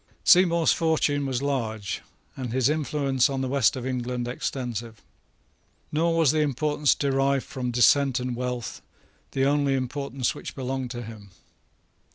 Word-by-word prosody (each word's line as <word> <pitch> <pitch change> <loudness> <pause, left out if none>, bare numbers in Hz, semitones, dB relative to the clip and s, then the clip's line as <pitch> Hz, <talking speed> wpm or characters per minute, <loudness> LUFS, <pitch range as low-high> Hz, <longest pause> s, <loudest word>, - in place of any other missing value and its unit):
Seymour's 170 -2 +5
fortune 150 -4 +1
was 130 0 -2
large, 110 -8 -2 0.3
and 125 -3 -5
his 130 +1 +2
influence 140 -3 +1
in 135 -1 -2
the 130 - -1
West 135 -2 +2
of 130 -1 -5
England 125 -1 -2
extensive. 120 -3 -4 0.9
Nor 165 +2 +1
was 160 -5 +4
the 155 - 0
importance 150 0 +1
derived 135 -1 +1
from 125 -2 -4
descent 130 +2 +4
and 125 -1 -3
wealth 125 -1 -4 0.5
the 135 0 +1
only 140 -1 +2
importance 130 0 -2
which - - -8
belonged 130 -1 -3
to 120 0 -6
him. 110 -3 -11
135 Hz, 145 wpm, -25 LUFS, 125-145 Hz, 0.9 s, Seymour's